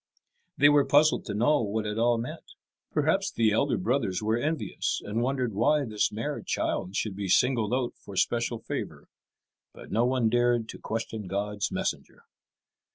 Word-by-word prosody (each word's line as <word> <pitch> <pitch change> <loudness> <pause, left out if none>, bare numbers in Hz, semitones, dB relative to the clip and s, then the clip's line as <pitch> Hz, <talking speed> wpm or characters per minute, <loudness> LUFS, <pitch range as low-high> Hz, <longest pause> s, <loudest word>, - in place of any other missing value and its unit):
They 145 - +6
were 145 -1 +5
puzzled 145 +3 +3
to 100 - -4
know 135 +7 +3
what 110 0 -2
it 105 +1 -3
all 120 0 +3
meant. 115 +2 -7 0.4
Perhaps 160 +6 +1
the 110 -2 +2
elder 105 - +1
brothers 100 -2 0
were 110 +1 0
envious, 155 +6 -2
and 110 +3 -2
wondered 125 -2 -1
why 140 +8 +2
this 110 -3 0
mere 140 +8 -4
child 95 +2 -2
should 105 -3 -2
be 100 -1 -4
singled 120 -2 +3
out 125 -1 0
for 100 - -11
special 120 +4 0
favour. 110 - -6 0.6
But - - -12
no 115 - +2
one 125 -3 +2
dared 120 0 +2
to - - -8
question 110 -2 -4
God's 100 +2 -2
messenger. - - -4
115 Hz, 165 wpm, -27 LUFS, 105-130 Hz, 0.6 s, They